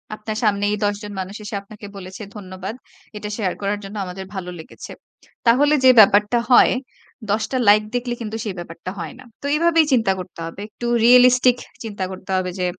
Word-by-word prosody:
আপনার 215 0 -5
সামনে 205 -2 +1
এই 210 - -1
১০ 205 0 +1
জন 205 - -7
মানুষ 190 +2 -5
এসে 205 0 -6
আপনাকে 205 +1 -13
বলেছে, 190 +3 -9
"ধন্যবাদ, 190 +1 -7 0.4
এটা 210 0 -6
শেয়ার 195 -5 -1
করার 205 +1 -1
জন্য, 195 +2 -9
আমাদের 190 +1 -7
ভালো 185 -2 -5
লেগেছে।" 160 - -11 0.6
তাহলে 285 +6 +5
যে 260 - +8
ব্যাপারটা 210 +2 +5
হয়, 245 - +7 0.6
১০ 215 +1 +1
টা 260 - 0
লাইক 210 +1 +6
দেখলে 245 0 -1
কিন্তু 220 -1 -4
সেই 200 -3 -4
ব্যাপারটা 170 +1 -7
হয় 165 -2 -6
না। - - -12 0.2
তো - - -8
এইভাবেই 330 0 +4
চিন্তা 225 -6 +3
করতে 180 - -9
হবে। 165 +3 -8
একটু 230 +3 -8 0.2
রিয়েলিস্টিক 250 0 +6 0.3
চিন্তা 205 -4 -5
করতে 185 0 -11
হবে, 185 -1 -1
যে 180 - 0
210 Hz, 190 wpm, -21 LUFS, 190-235 Hz, 0.6 s, যে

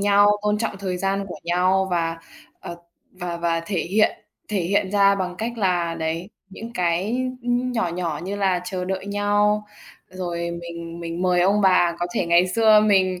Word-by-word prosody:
nhau, 205 0 +5
tôn 210 0 +1
trọng 225 -2 -2
thời 185 -2 -3
gian 195 +1 -1
của - - -7
nhau 185 +2 +2
và, 165 -2 0 0.4
ờ, 170 - -7 0.4
và 180 -2 -5
và 170 -1 0
thể 190 -2 -1
hiện 210 +5 +2 0.4
thể 205 -2 -1
hiện 190 +2 0
ra 200 -1 +4
bằng 180 -2 -3
cách 235 +1 -4
là 175 -4 +1
đấy 165 +3 -3 0.2
những 225 +4 -9
cái, 180 +5 0 0.3
ưm, 245 +1 0
nhỏ 225 -7 0
nhỏ 170 -3 -3
như 200 +2 -4
là 190 -3 +1
chờ 180 0 -4
đợi 190 +1 -4
nhau. 205 +1 +1 0.4
Rồi 175 -2 -4
mình 170 0 -8
mình 170 +1 -4
mời 180 -1 +3
ông 200 +4 +3
bà 180 -3 +3
có 175 - -1
thể - - 0
ngày 170 +1 +4
xưa 215 +2 +5
mình 190 -3 +2
185 Hz, 185 wpm, -23 LUFS, 175-205 Hz, 0.4 s, nhau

